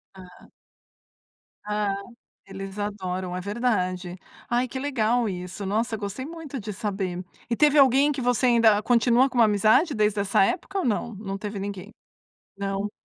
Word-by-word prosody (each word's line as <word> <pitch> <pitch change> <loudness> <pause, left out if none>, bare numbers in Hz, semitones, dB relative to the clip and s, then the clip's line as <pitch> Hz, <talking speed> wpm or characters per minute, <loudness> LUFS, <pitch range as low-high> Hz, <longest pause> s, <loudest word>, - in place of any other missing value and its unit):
Ah. 180 -1 -14 1.2
Ah. 210 -1 -1 0.5
Eles 195 +1 -8
adoram, 185 -3 -3
é - - -3
verdade. 185 -4 -1 0.3
Ai, 245 +1 +1
que 260 - -5
legal 245 -4 +1
isso. 185 +1 -6
Nossa! 220 +3 0
Gostei 205 +5 -5
muito 315 -3 -7
de 210 0 -6
saber. 190 -3 -3 0.3
E 235 - +1
teve 300 +2 +4
alguém 275 +1 +5
que 275 - -4
você 245 0 +2
ainda 230 -4 +5
continua 245 +2 +4
com 255 - -9
uma 235 - +7
amizade 215 - +3
desde 210 -1 +1
essa 195 -1 +3
época 365 - -2
ou 380 - -1
não? 230 0 -1
Não 195 -1 -5
teve 205 0 -5
ninguém. 200 0 -6 0.7
Não? 200 +1 -3
210 Hz, 155 wpm, -25 LUFS, 195-245 Hz, 1.2 s, uma